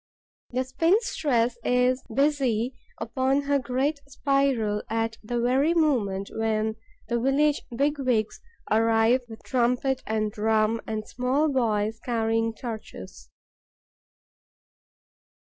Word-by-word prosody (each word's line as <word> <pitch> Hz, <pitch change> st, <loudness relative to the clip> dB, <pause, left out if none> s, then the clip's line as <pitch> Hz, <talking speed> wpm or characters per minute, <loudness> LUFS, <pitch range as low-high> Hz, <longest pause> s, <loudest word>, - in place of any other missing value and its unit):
The 255 Hz, +1 st, -1 dB
spinstress 260 Hz, -, +1 dB
is 250 Hz, +1 st, +2 dB
busy 260 Hz, -3 st, +1 dB, 0.2 s
upon 260 Hz, +5 st, 0 dB
her 280 Hz, 0 st, +1 dB
great 270 Hz, +4 st, -1 dB
spiral 270 Hz, -6 st, +1 dB
at 225 Hz, 0 st, -1 dB
the 240 Hz, +3 st, -2 dB
very 265 Hz, +7 st, +2 dB
moment 215 Hz, -, +1 dB
when 220 Hz, 0 st, -1 dB, 0.3 s
the 235 Hz, +1 st, 0 dB
village 280 Hz, +4 st, +2 dB
big 285 Hz, +3 st, +1 dB
wigs 235 Hz, -5 st, 0 dB, 0.3 s
arrive 225 Hz, +3 st, +3 dB
with 225 Hz, -, -11 dB
trumpet 250 Hz, +1 st, +1 dB
and 215 Hz, -1 st, 0 dB
drum 220 Hz, +1 st, +1 dB
and 215 Hz, -1 st, -4 dB
small 265 Hz, +5 st, 0 dB
boys 220 Hz, -4 st, 0 dB
carrying 225 Hz, -1 st, 0 dB
torches. 210 Hz, -, -8 dB
240 Hz, 105 wpm, -26 LUFS, 220-270 Hz, 0.3 s, arrive